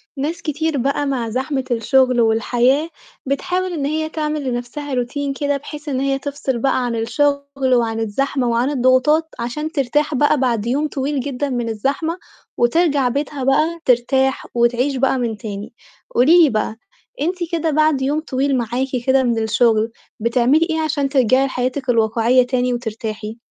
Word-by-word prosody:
ناس 315 +5 -3
كتير 315 -1 -1
بقى 275 +3 0
مع 250 -4 -2
زحمة 265 +3 -2
الشُغل 250 +1 +3
والحياة، 245 +7 +2 0.4
بتحاول 360 +7 -1
إن 285 -4 -2
هي 315 +2 -1
تعمل 305 -2 -2
لنَفْسها 260 +3 -4
روتين 275 +3 -2
كده 285 0 -1
بحيث 295 +1 -8
إن 260 - -1
هي 270 0 0
تفصل 275 -3 -3
بقى 255 0 +1
عن 240 -1 -2
الشُغل 280 +3 0
وعن 225 -2 0
الزحمة، 250 +4 -1
وعن 235 +3 +1
الضغوطات 275 +4 +3
عشان 275 +7 -3
ترتاح 295 +1 0
بقى 290 +2 +3
بعد 235 -5 0
يوم 280 +6 0
طويل 280 0 -2
جدًا 280 +1 -3
من 240 -3 -2
الزحمة، 280 - -2 0.4
وترجع 280 +1 +2
بيتها 280 +1 -3
بقى 310 +6 +1
ترتاح 265 +2 +2
وتعيش 240 +3 +1
بقى 265 +1 +1
من 235 -3 -2
تاني. 205 0 -7 0.4
قولي 325 +8 +6
لي 305 - +5
بقى، 215 -1 -2 0.4
أنتِ 350 +4 0 0.2
كده 330 -1 0
بعد 305 -2 +2
يوم 285 +3 0
طويل 275 -2 0
معاكِ 245 +2 -1 0.2
كده 265 0 +4
من 235 -3 0
الشُغل، 220 0 +2 0.3
بتعملي 245 +7 +3
إيه 320 0 0
عشان 300 -3 0
ترجعي 260 0 +3
لحياتِك 260 0 -3
الواقعية 230 +2 +3
تاني 250 -1 0
وترتاحي؟ 220 -2 -5
265 Hz, 160 wpm, -19 LUFS, 240-290 Hz, 0.4 s, قولي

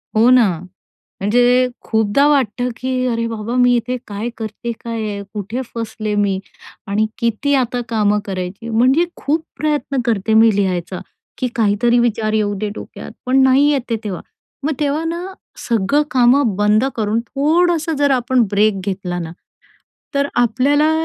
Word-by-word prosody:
हो 225 +3 +5
ना. 250 -5 +6 0.7
म्हणजे 245 +4 +3 0.2
खूपदा 220 +5 +2
वाटतं, 250 -4 +1
की 255 0 -2
अरे 230 -1 -1
बाबा, 225 +1 -4
मी 245 0 +4
इथे 245 +2 -2
काय 210 +3 -4
करते 220 +1 -5
काय 230 -1 -3
आहे? 200 -1 -5
कुठे 215 +6 -4
फसले 220 -2 -3
मी? 195 -2 0 0.5
आणि 210 +2 +1
किती 235 +5 0
आता 250 -2 0
कामं 210 -2 +2
करायची? 190 +3 -5
म्हणजे 255 +8 +3
खूप 310 +3 -1
प्रयत्न 295 -3 -1
करते 220 -2 0
मी 225 -2 +5
लिहायचा, 185 -2 -1 0.4
की 250 - -1
काहीतरी 230 +2 +2
विचार 225 -2 +1
येऊ 210 -1 +1
दे, 210 +1 -2
डोक्यात - - -9
पण 265 +1 +4
नाही 265 +2 +5
येते 250 -4 -1
तेव्हा. 195 -4 -4 0.4
मग 310 - 0
तेव्हा 295 +2 0
ना, 335 +1 -3 0.5
सगळं 235 +5 +2
कामं 250 -2 +3
बंद 210 +3 +3
करून, 220 0 0
थोडंसं 325 +3 +1
जर 285 0 +2
आपण 255 -1 +2
ब्रेक 205 -1 +2
घेतला 185 -2 -3
ना, 165 -2 -5 0.8
तर 280 0 +1
आपल्याला 275 +6 +3
235 Hz, 150 wpm, -18 LUFS, 210-265 Hz, 0.8 s, ना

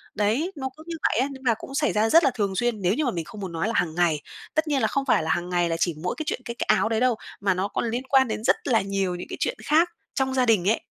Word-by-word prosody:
Đấy, 235 - +1
nó 265 -2 -4
cứ 315 - -12
như 335 - -4
vậy - - +2
á, 270 - +1
nhưng 265 -1 -10
mà 230 - +4
cũng 270 - -9
xảy 300 +1 +1
ra 215 +1 +2
rất 330 +5 +6
là 270 - +4
thường 200 -5 -1
xuyên, 235 -1 0
nếu 180 +2 +2
như 300 +3 0
mà 245 - +1
mình 165 -4 -4
không 205 +5 -10
muốn 185 -3 -5
nói 165 +5 -1
là 230 - -1
hàng 160 -2 0
ngày. 165 -4 +2 0.3
Tất 315 0 +1
nhiên 285 -3 +1
là - - +3
không 275 -1 -1
phải 250 - +3
là 160 - -3
hàng 175 +1 -1
ngày 175 -1 +1
là 165 - -1
chỉ 170 -4 +1
mỗi 180 - -1
cái 315 - -2
chuyện - - -2
cái 235 - -5
cái - - -3
áo 215 +1 +3
đấy 225 -1 +1
đâu, 250 -2 +3 0.2
mà 195 -2 +2
nó 190 +2 -1
còn 230 +3 -2
liên 245 +3 -2
quan 265 -2 +5
đến 220 0 -4
rất - - +4
là 230 -5 +3
nhiều 195 -2 -1
những 180 - -7
cái - - -5
chuyện - - -1
khác 325 +4 +4 0.2
trong 265 -1 0
gia 255 -1 +2
đình 205 -4 +3
ấy. 225 - +1
225 Hz, 330 wpm, -25 LUFS, 185-265 Hz, 0.3 s, rất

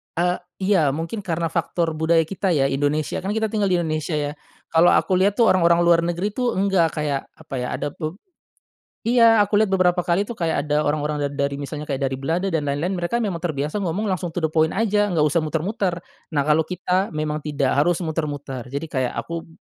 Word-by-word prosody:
E 175 +1 +1 0.2
iya 185 -7 +3
mungkin 165 +7 -4
karena 170 -4 -2
faktor 170 -1 -1
budaya 165 +1 +3
kita 190 +2 -1
ya, 135 -2 +2
Indonesia, 145 +2 0
kan 195 +2 -3
kita 220 -1 0
tinggal 210 -3 +1
di 185 - +2
Indonesia, 155 0 -2
ya. 145 -1 -1 0.4
Kalau 165 +2 +5
aku 185 - +2
lihat 200 +2 +3
tuh, 230 - +6
orang-orang 170 -2 +4
luar 170 -1 +5
negeri 175 +4 -1
itu 245 +2 0
enggak. 190 -4 +2
Kayak, 140 -2 -2
apa 150 -3 -9
ya, 125 - -2
ada - - -3
be 155 +3 -5 0.9
iya, 230 -2 +6
aku 205 0 +2
liat 210 -1 +3
beberapa 180 -2 +2
kali 185 +4 +1
tuh, 235 - -6
kayak 160 -5 -1
ada 150 +1 +2
orang-orang 150 -1 -1
dari 140 0 -1
misalnya 145 +1 -6
kayak 140 -1 -2
dari 130 - -4
Belanda 170 +7 -1
dan 150 -3 -1
lain-lain 145 +6 -1
mereka 195 +6 -1
memang 185 -5 -2
terbiasa 155 +2 -2
ngomong 185 +2 -2
langsung 185 -5 -2
to 175 - -2
the 160 - +1
point 160 0 +2
aja 205 -1 +2
nggak 165 -6 +1
usah 150 +3 +2
muter-muter. 170 +4 -1 0.4
Nah, 140 - +3
kalo 155 +2 +2
kita 185 +1 0
memang 155 0 -2
tidak 145 -3 -1
harus 170 +5 +2
muter-muter, 145 -6 -4
jadi 140 +4 -4
kayak 130 -2 -1
aku 170 0 -5
165 Hz, 205 wpm, -22 LUFS, 150-190 Hz, 0.9 s, tuh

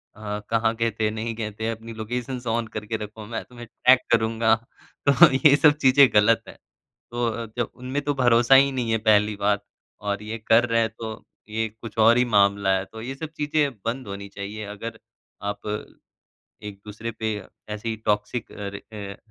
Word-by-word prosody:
अ, 105 -1 -5
कहाँ 115 0 +2
गये 115 0 0
थे, 110 0 -1
नहीं 110 +1 -4
गए 110 -2 -4
थे 110 +1 -1
अपनी 115 0 -6
लोकेशंस 120 +3 -5
ऑन 115 0 0
करके 110 +1 -3
रखो 105 0 -8
मैं 115 +1 -5
तुम्हें 120 -1 -11
ट्रैक 125 +2 +4
करूँगा 110 0 +3 0.5
तो - - +8 0.4
ये 140 - +7
सब 150 0 +6
चीज़ें 135 +1 +7
गलत 105 +2 +4
है। - - -9 0.6
तो 120 0 -1
अ, 115 +1 -4
जब 120 - -1
उनमें 130 +3 -3
तो 145 0 0
भरोसा 120 0 +5
ही 140 +1 +6
नहीं 120 -3 -2
है 110 - +3
पहली 105 0 +4
बात 100 0 0 0.4
और 100 0 -2
ये 110 +2 -5
कर 115 +2 +5
रहे 115 0 +3
हैं 110 - +1
तो 110 -1 -6 0.3
ये 110 +1 -1
कुछ 115 -1 -9
और 120 +1 +6
ही 125 - +4
मामला 100 -1 +3
है 95 - -4
तो 110 +2 -11
ये 130 +3 -5
सब 155 +2 -6
चीज़ें 150 -1 +1
बंद 120 0 -3
होनी 100 0 -6
चाहिए 105 +2 -6
अगर 110 +2 -7 0.5
आप 100 - -10 1.0
एक-दूसरे 105 +2 -7
पे 110 -1 -3 0.3
ऐसे 105 +2 -5
ही 110 - -2
टॉक्सिक 105 +3 -1
अ 100 -1 -6 0.3
अ, 100 -1 -7
110 Hz, 190 wpm, -24 LUFS, 105-120 Hz, 1.0 s, तो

